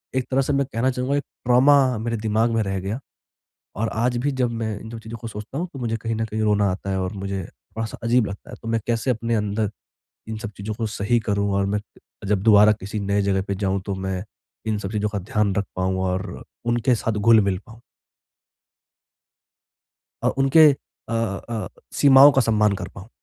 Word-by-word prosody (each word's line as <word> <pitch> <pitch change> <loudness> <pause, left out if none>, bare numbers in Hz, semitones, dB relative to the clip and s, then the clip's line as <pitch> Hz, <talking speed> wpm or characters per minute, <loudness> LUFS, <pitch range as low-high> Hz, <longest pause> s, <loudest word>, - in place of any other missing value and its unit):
एक 130 -1 +1
तरह 135 - +3
से 140 +2 0
मैं 140 0 +2
कहना 115 +3 +1
चाहूँगा 125 +2 -1
एक 145 - -1 0.2
ट्रॉमा 130 +1 +5
मेरे 115 0 -2
दिमाग 110 +2 +1
में 110 - +2
रह 95 -1 -2
गया, 100 +7 -3 0.8
और 110 +3 -1
आज 120 +2 0
भी 140 +4 0
जब 125 -2 0
मैं 110 -3 -3
इन 110 - -9
सब 115 - -6
चीज़ों 110 +1 -8
को 115 - -5
सोचता 110 +4 -7
हूँ, 175 +3 -2
तो 135 - -7
मुझे 115 -2 -1
कहीं 115 0 -3
न 110 0 -1
कहीं 110 0 -3
रोना 105 -1 +3
आता 95 +1 -5
है 95 - 0
और 95 +1 -3
मुझे 95 -1 -4
थोड़ा-सा 110 +5 -7
अजीब 120 0 +3
लगता 100 - -9
है। - - -7
तो 115 - -8
मैं 115 0 +1
कैसे 120 +2 +1
अपने 115 0 -1
अंदर, 105 0 0 0.6
इन 110 -1 -4
सब 110 -1 -6
चीज़ों 105 +2 -4
को 110 +1 -3
सही 105 +3 0
करूँ 100 -1 +1
और 100 - +2
मैं 105 +1 0 0.5
जब 100 -1 +1
दोबारा 105 -1 +7
किसी 105 +1 -5
नए 100 0 +1
जगह 100 -1 +1
पे 100 - -1
जाऊँ, 95 -1 -1
तो 100 0 -4
मैं 95 0 -3 0.4
इन 110 - 0
सब 100 -1 -5
चीज़ों 105 -1 0
का 100 -1 -3
ध्यान 100 +1 0
रख 100 - 0
पाऊँ 95 0 0
और 95 +2 -3 0.2
उनके 120 +1 +2
साथ 115 0 -1
घुल-मिल 105 -2 +4
पाऊँ? 115 0 -13 2.4
अ, - - +3
उनके 145 +4 +7 0.4
अ - - -2
अ, 110 -2 -2 0.3
सीमाओं 140 +1 +8
का 135 - +3
सम्मान 105 -3 +3
कर - - -4
पाऊँ। 100 +3 -10
110 Hz, 210 wpm, -23 LUFS, 100-120 Hz, 2.4 s, सीमाओं